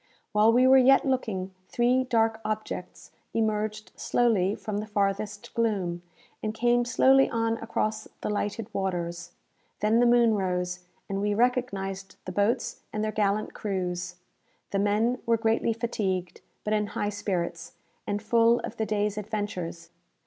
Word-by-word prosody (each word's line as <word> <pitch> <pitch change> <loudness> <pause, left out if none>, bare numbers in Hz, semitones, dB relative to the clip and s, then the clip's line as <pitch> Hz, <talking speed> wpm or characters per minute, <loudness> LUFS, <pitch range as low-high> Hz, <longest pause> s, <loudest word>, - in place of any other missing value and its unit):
While 210 +2 +5
we 250 +2 +5
were 265 +1 +7
yet 270 +1 +5
looking, 210 -8 -1 0.2
three 250 +2 +2
dark 225 -2 +1
objects 215 -4 -5 0.2
emerged 215 -1 -1
slowly 210 -5 +2
from 210 -2 -4
the 215 - -5
farthest 205 0 -2
gloom, 195 -7 0 0.4
and 215 0 -3
came 240 +1 +2
slowly 270 +2 +5
on 230 0 0
across 215 -1 -2
the - - -2
lighted 210 +1 -2
waters. 175 -2 -3 0.5
Then 215 +2 +3
the 245 - +5
moon 235 -1 +5
rose, 180 -2 -1 0.3
and 195 0 -2
we 205 0 +1
recognized 200 -5 -1
the 185 - -4
boats 205 +5 0
and 215 - -2
their 215 - 0
gallant 210 0 0
crews. 180 -3 -3 0.6
The 195 - 0
men 215 +5 +1
were 230 0 +4
greatly 225 0 +1
fatigued, 195 -6 -2 0.2
but 210 - -1
in 210 -1 +1
high 205 - -2
spirits, 180 -5 -3 0.3
and 205 +1 -2
full 230 +1 +4
of 235 - -7
the 220 - -1
day's 210 0 0
adventures. 190 -6 -4
210 Hz, 150 wpm, -27 LUFS, 195-230 Hz, 0.6 s, were